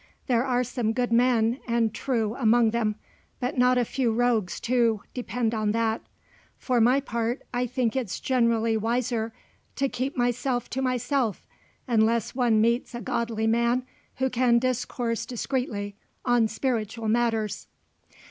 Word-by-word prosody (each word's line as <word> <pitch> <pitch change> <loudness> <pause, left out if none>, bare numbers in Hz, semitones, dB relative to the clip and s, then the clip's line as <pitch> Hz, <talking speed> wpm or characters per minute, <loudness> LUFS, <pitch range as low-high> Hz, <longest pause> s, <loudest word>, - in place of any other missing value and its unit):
"There 240 -3 +2
are 250 -1 +1
some 240 -2 -1
good 245 0 -1
men 235 0 +3
and 230 -2 +1
true 225 -3 -1
among 235 -2 +3
them, 215 -2 0 0.4
but 250 +3 -2
not 250 0 +4
a 245 - +2
few 245 0 0
rogues 225 -5 +1
too, 235 -3 +1
depend 245 -2 -2
on 215 -2 0
that. 225 0 0 0.6
For 250 -3 +1
my 250 +4 +5
part, 235 -1 -2
I 245 +1 0
think 245 -1 -1
it's 245 -8 -2
generally 230 -3 +2
wiser 230 0 -1 0.4
to 275 - +1
keep 265 +2 -3
myself 245 +1 0
to 265 - -2
myself, 255 -3 0 0.4
unless 230 -1 +2
one 240 -4 +2
meets 235 +2 +1
a 240 - -5
godly 230 -2 -1
man 235 +2 +2 0.3
who 265 0 0
can 245 -1 +3
discourse 245 -1 -1
discreetly 240 -5 -3 0.3
on 245 -2 +3
spiritual 225 -1 -2
matters." 225 -2 0
235 Hz, 145 wpm, -26 LUFS, 225-250 Hz, 0.6 s, my